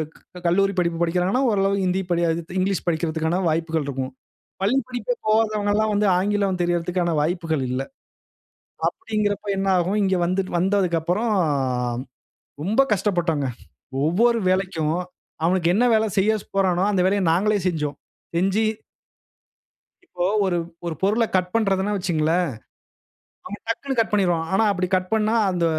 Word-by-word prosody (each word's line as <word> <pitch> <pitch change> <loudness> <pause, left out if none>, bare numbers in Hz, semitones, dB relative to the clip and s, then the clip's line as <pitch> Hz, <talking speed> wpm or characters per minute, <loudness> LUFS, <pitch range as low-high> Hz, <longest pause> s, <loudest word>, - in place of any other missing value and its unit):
க் 180 - -15
கல்லூரி 195 +3 +2
படிப்பு 170 -1 0
படிக்கிறாங்கனா 180 +7 +1
ஓரளவுக்கு 195 -2 +1
ஹிந்தி 185 +1 +1
படி 170 -1 +1 0.4
இங்கிலீஷ் 190 0 0
படிக்கிறதுக்கான 160 0 0
வாய்ப்புகள் 160 -1 -1
இருக்கும். 130 -2 -3 0.5
பள்ளி 210 +7 +2
படிப்பே 255 - -2
போகாதவங்கல்லாம் 215 -1 +2
வந்து 205 +1 +2
ஆங்கிலம் 195 -1 0
தெரியறதுக்கான 175 0 0
வாய்ப்புகள் 160 -2 -1
இல்ல. 130 +1 -1 1.1
அப்படீங்கிறப்ப 210 - -2
என்னாகும், 190 0 +1
இங்க 190 -1 +2
வந்துட் 185 +2 -1
வந்ததுக்கப்பறம் 185 +3 +1 1.3
ரொம்ப 210 - +2
கஷ்டப்பட்டோங்க. 175 -7 0 0.6
ஒவ்வொரு 230 +9 +3
வேலைக்கும், 185 -5 0 0.5
அவனுக்கு 175 -1 +2
என்ன 230 +5 +3
வேல 220 0 +3
செய்ய 205 +3 +3
ஸ் - - -26
போறானோ, 185 -2 +2
அந்த 195 -3 +1
வேலைய 200 +1 +2
நாங்களே 205 +5 +2
செஞ்சோம். 150 -4 -2 0.4
செஞ்சு. 195 +5 +2 1.4
இப்போ 180 - -4 0.2
ஒரு 180 -2 +1 0.3
ஒரு 170 -2 -3
பொருள 215 +4 +3
கட் 180 -1 +1
பண்றதுன்னா 200 -2 +1
வச்சுக்கங்களேன், 175 -2 +1 1.0
அவன் 205 +1 -7
டக்குனு 270 +3 -2
கட் 225 - +1
பண்ணிருவான். 175 -5 +1
ஆனா 195 - +3
அப்படி 185 -2 -1
கட் 185 0 -1
பண்னா, 220 +1 +2 0.2
அந்த 175 -2 0
185 Hz, 130 wpm, -23 LUFS, 170-205 Hz, 1.4 s, ஒவ்வொரு